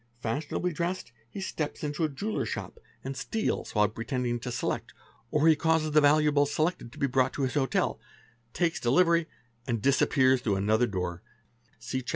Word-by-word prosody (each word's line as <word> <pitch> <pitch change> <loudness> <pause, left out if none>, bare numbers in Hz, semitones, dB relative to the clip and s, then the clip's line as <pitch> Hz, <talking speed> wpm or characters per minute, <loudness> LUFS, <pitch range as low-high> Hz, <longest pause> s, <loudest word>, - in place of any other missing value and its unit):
Fashionably 150 +9 -2
dressed, 170 -4 -3 0.2
he 195 - -7
steps 155 -6 -4
into 150 +2 -2
a 155 - +2
jeweller's 205 +10 -3
shop - - -6 0.2
and 135 +1 -4
ste - - -8
FALSE - - -2
NAMES - - 0
Sit - - -11
while 105 0 +4
pretending 120 +2 -2
to 125 - -5
select, - - -3 0.3
or 150 +3 +2
he 160 - +7
causes 160 0 +1
the 150 0 +5
valuables 145 -1 +4
selected 155 -6 -1
to 150 - -15
be 140 - +1
brought 130 0 +1
to 140 - -2
his 130 - -1
hotel, 135 -3 0 0.5
takes 170 -2 0
delivery, 170 +6 +3 0.4
and 120 -3 0
disappears 130 +1 +3
through 105 -5 0
another 110 +5 +2
door 90 -3 -3 0.6
(see 120 +3 -4
Chap. 125 - -8
140 Hz, 190 wpm, -28 LUFS, 120-155 Hz, 0.6 s, he